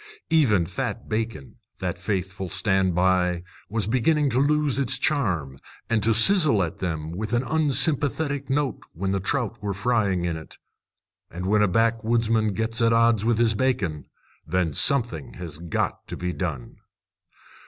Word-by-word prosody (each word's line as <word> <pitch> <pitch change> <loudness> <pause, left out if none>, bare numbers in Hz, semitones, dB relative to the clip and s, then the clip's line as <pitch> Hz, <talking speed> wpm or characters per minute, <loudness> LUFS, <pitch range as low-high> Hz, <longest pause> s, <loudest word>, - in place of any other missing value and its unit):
Even 115 - +4
fat 90 +2 -4
bacon, 110 - -4 0.2
that - - -4
faithful 95 -1 -3
stand 95 -1 +1
by, 90 -1 +2 0.3
was 110 -1 -1
beginning 135 +6 +2
to 125 - +1
lose 145 -1 +2
its 135 0 0
charm, 90 - -1 0.3
and 115 -2 +2
to 115 - +2
sizzle 115 - +5
at 85 - -5
them 80 -3 -3
with 105 +6 -4
an 120 +1 +2
unsympathetic 145 -1 0
note 135 -1 -1
when 95 +3 -2
the 95 - 0
trout 120 +1 -2
were 100 -2 -3
frying 100 -5 +1
in 85 -1 -1
it. 80 - -11 0.7
And 90 +2 -6
when 105 +2 +3
a 105 - +4
backwoodsman 115 0 +1
gets 115 +2 -1
at 115 0 +4
odds 115 -2 +3
with 115 0 +2
his 115 -1 +3
bacon, 105 - -1 0.4
then 85 0 -1
something 120 - 0
has 85 -4 -7
got 85 -1 -3
to - - -6
be 90 0 -3
done. 80 -11 -5
110 Hz, 155 wpm, -24 LUFS, 90-125 Hz, 0.7 s, sizzle